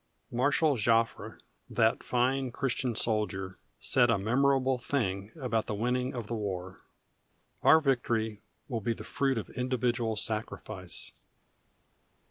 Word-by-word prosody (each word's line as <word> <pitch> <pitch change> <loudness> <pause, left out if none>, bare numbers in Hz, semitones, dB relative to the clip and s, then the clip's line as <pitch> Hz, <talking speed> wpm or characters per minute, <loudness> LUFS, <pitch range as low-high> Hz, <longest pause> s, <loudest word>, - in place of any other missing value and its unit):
Marshal 140 +3 +2
Joffre, 115 +1 +1 0.3
that 110 0 +2
fine 130 +1 +1
Christian 125 -2 -1
soldier, 95 -5 -2 0.2
said 120 -2 +3
a 115 - +4
memorable 130 +4 +2
thing 100 -6 -1
about 115 -5 -1
the 105 - -2
winning 125 +4 0
of 120 -3 -4
the 115 - -5
war: 95 -4 -4 0.8
"Our 160 - +7
victory 115 -7 0 0.3
will 115 -5 -3
be 115 +3 0
the - - -8
fruit 135 -2 0
of 110 - -4
individual 125 -2 0
sacrifice." 105 -4 -4
115 Hz, 120 wpm, -30 LUFS, 110-130 Hz, 0.8 s, Our